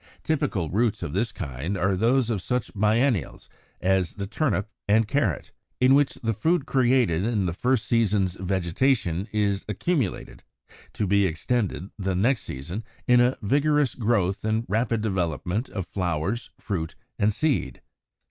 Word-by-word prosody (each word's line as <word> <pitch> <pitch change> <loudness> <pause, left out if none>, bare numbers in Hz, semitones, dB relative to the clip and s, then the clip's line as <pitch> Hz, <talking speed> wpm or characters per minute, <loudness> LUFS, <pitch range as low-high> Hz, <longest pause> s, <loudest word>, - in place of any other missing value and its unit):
Typical 115 - -1
roots 110 +3 +1
of 70 - -4
this 105 +4 0
kind 80 0 -4
are 95 +2 +1
those 120 +4 +2
of 105 -5 -1
such 125 +4 -2
biennials 110 - +1 0.3
as 95 -1 +1
the 100 - -5
turnip 105 -2 -1 0.2
and 110 +1 +3
carrot; 110 - 0 0.3
in 130 +1 +5
which 145 0 +3
the 115 -1 -2
food 160 - +1
created 125 - +2
in 105 -3 0
the 85 - -1
first 125 +4 +1
season's 105 -5 +2
vegetation 95 +1 0
is 100 -2 0
accumulated, 125 - -2 0.5
to 105 - -2
be 100 0 +3
expended 95 +3 -2
the 95 -1 -1
next 115 +7 +2
season 85 - -6 0.2
in 125 -1 +6
a 125 +2 +2
vigorous 145 +4 +2
growth 105 -5 0
and 110 +1 0
a - - -17
rapid 115 +2 0
development 95 - -1
of 95 -4 -4
flowers, 90 +4 -2
fruit, 85 -8 -3 0.2
and 105 +1 +3
seed. 135 - -1
105 Hz, 150 wpm, -25 LUFS, 95-120 Hz, 0.5 s, in